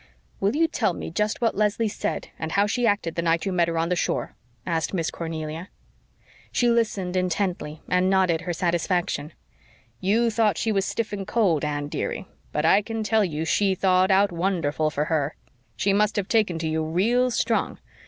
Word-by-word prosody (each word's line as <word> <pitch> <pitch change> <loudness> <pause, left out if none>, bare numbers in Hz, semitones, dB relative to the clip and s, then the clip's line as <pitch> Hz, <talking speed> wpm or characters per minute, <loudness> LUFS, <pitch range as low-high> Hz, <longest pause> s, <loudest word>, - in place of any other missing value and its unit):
"Will 200 +6 +1
you 330 +2 +4
tell 220 - 0
me - - -6
just 210 +7 -1
what 230 - +2
Leslie 210 +2 +1
said 205 - -3
and 160 0 -4
how 200 +1 +4
she 240 +3 +1
acted 205 -6 0
the 170 - -1
night 165 +1 +1
you 195 - -1
met 175 -1 +2
her 165 0 -2
on 165 +1 0
the 180 - +2
shore?" - - -1 0.3
asked 165 +1 -1
Miss 165 -3 -1
Cornelia. 160 +1 -5 0.8
She 245 - +2
listened 210 -6 0
intently 180 -4 -1
and 180 +1 +2
nodded 185 -4 +2
her 175 0 -3
satisfaction. 170 -3 -1 0.7
"YOU 225 +5 +2
thought 215 -4 +2
she 225 - 0
was 195 -2 +1
stiff 225 -2 -3
and 195 -2 -4
cold, 190 -10 +2
Anne, 145 -1 -2
dearie, - - -3 0.3
but 150 +1 -1
I 195 +5 +5
can 225 +1 -4
tell 215 +1 +3
you 160 -4 -2
she 195 +3 +2
thawed 185 0 +3
out 195 0 +4
wonderful 165 -4 0
for 150 0 -1
her. 155 -2 -1 0.4
She 195 0 +1
must 210 +2 +2
have 200 -3 -1
taken 215 -7 +2
to 165 0 -2
you 160 0 0
real 225 +11 +2
strong. 240 - 0
185 Hz, 195 wpm, -25 LUFS, 165-210 Hz, 0.8 s, I